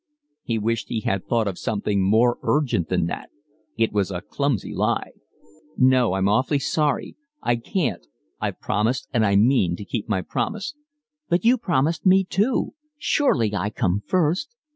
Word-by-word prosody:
He 115 -5 -2
wished 115 +1 -1
he 115 - -2
had 100 -1 -2
thought 115 -1 +1
of 95 -3 -4
something 100 -2 -1
more 110 +5 +3
urgent 125 - +1
than 90 -3 +1
that. 85 - -5 0.5
It 115 -2 +1
was 100 -2 +1
a 90 -2 -4
clumsy 140 -4 -2
lie. - - 0 0.7
"No, 130 -5 +4
I'm 95 0 +1
awfully 130 +8 +2
sorry, 145 +1 -1 0.3
I 120 - +2
can't—I've - - -4
promised 115 +5 0
and 115 -3 +3
I 100 -2 +3
mean 100 -5 +3
to 100 - -8
keep 110 +1 -4
my 95 -4 0
promise." 215 +5 -3 0.6
"But 175 +2 +1
you 240 +2 +6
promised 165 - 0
me 190 +1 +5
too. 205 +7 0 0.2
Surely 125 - +1
I 105 +1 -1
come 100 -1 0
first." 185 - 0
115 Hz, 160 wpm, -23 LUFS, 100-150 Hz, 0.7 s, you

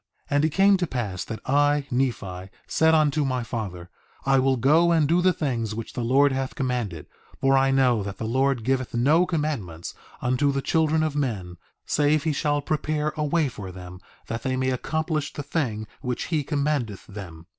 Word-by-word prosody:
3:7 - - 0
And 145 +2 +4
it - - +2
came 195 +4 +4
to 180 -2 -1
pass 105 -10 -3
that 110 -2 -6
I, 145 +1 +3
Nephi, 100 -8 -2 0.2
said 160 0 +3
unto 155 -1 +2
my 130 -3 -1
father: 95 -7 -5 0.3
I 135 0 +4
will 130 0 +2
go 155 +8 +4
and 160 -3 +3
do 170 +3 +3
the 185 +1 +4
things 120 - -2
which 115 0 -6
the 125 - -3
Lord 135 +4 +4
hath 130 0 -3
commanded, 120 - -2 0.3
for 135 0 +3
I 135 0 +4
know 130 -4 +3
that 100 -1 -5
the 110 - -4
Lord 130 +1 +1
giveth 130 0 -1
no 150 +9 +4
commandments 130 - -3 0.3
unto 130 +3 +1
the 135 -1 -2
children 160 +1 +2
of 155 -2 -1
men, 105 -11 -2 0.3
save 150 0 +2
he 160 - 0
shall 145 0 0
prepare 155 0 -1
a 155 - -1
way 150 +1 +2
for 100 -6 -7
them 90 0 -10 0.3
that 115 0 -4
they 130 0 -1
may 130 0 +1
accomplish 155 +3 -2
the 145 - -5
thing 115 -9 -2 0.2
which 125 -1 -3
he 150 -2 +2
commandeth 140 - -1
them. 90 -5 -9
135 Hz, 195 wpm, -25 LUFS, 115-150 Hz, 0.3 s, And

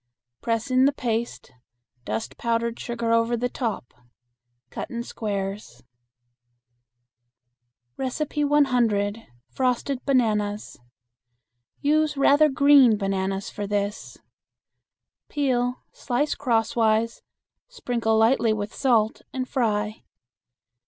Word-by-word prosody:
Press 230 +2 -2
in 255 +1 +4
the 280 - +4
paste, 235 - -3 0.5
dust 110 +5 -4
powdered 235 +2 -1
sugar 235 -1 -2
over 230 +1 +2
the 245 +2 0
top. 225 - -4 0.8
Cut - - -6
in 235 -1 -4
squares. 200 -3 -5 2.1
100. 255 -7 0 0.2
Frosted 255 +1 -1
Bananas. 215 -6 0 1.0
Use 305 0 +1
rather 290 +2 +5
green 280 -5 +6
bananas 195 -1 -2
for 205 -1 -5
this. 205 0 -3 1.1
Peel, 250 -3 -1
slice 275 +4 -1
crosswise, 225 -2 +1 0.5
sprinkle 240 - -1
lightly 225 0 +3
with 210 0 -4
salt 225 -5 +1
and 255 -1 -3
fry. 215 -4 -1
235 Hz, 90 wpm, -24 LUFS, 215-260 Hz, 2.1 s, green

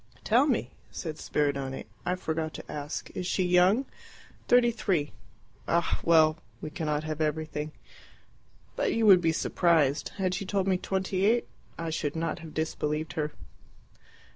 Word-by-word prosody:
"Tell 245 +7 +4
me," 225 - 0 0.2
said 155 -2 -5
Spiridione 140 -2 -1 0.2
"I 180 - +2
forgot 160 -3 -3
to - - -8
ask 145 +1 -5
is 180 - -4
she 185 - +1
young?" 180 +8 +4 0.6
"Thirty 245 -1 +5
three." 185 - 0 0.6
"Ah, 170 0 +1
well, 160 -1 +5 0.2
we 155 - -6
cannot 150 -3 -1
have 155 0 -4
everything." 155 0 -2 1.0
"But - - 0
you 230 - +2
would 190 -4 +8
be 165 -1 +3
surprised. 160 -3 +2
Had 185 -2 0
she 185 - -2
told 195 0 -1
me 185 -1 +2
twenty 190 0 -1
eight, 235 +3 +3 0.3
I 165 -1 -3
should 155 -2 -2
not 165 +1 -2
have 160 -2 -10
disbelieved 155 -1 -2
her." 150 -1 -2
165 Hz, 150 wpm, -28 LUFS, 155-190 Hz, 1.0 s, would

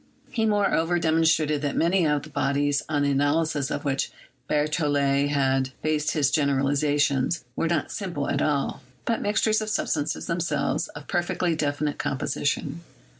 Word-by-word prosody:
He, 225 -2 +1
moreover, 195 -5 +2
demon 165 -1 +2
strated 155 -2 +2
that 145 -2 -2
many 170 0 +3
of 150 -1 +1
the 155 - -11
bodies, 140 0 +1
on 145 -2 +1
the 140 - +2
analysis 145 +1 +1
o£ - - -3
which 135 -2 -1 0.4
Berthollet 145 -2 +1
had 135 -2 +1
based 155 -1 0
his 145 -4 +2
generalization, 140 -1 +2 0.3
were 165 - 0
not 165 -2 -1
simple 175 -9 -3
at 140 - 0
all, 145 -2 0 0.2
but 230 - 0
mixtures 215 +1 +2
of 215 - -3
substances, 155 -8 -1
themselves 160 -4 -1
of 145 0 -11
perfectly 175 -1 0
definite 145 -1 -1
composition. 145 +4 -2
150 Hz, 150 wpm, -25 LUFS, 140-165 Hz, 0.4 s, many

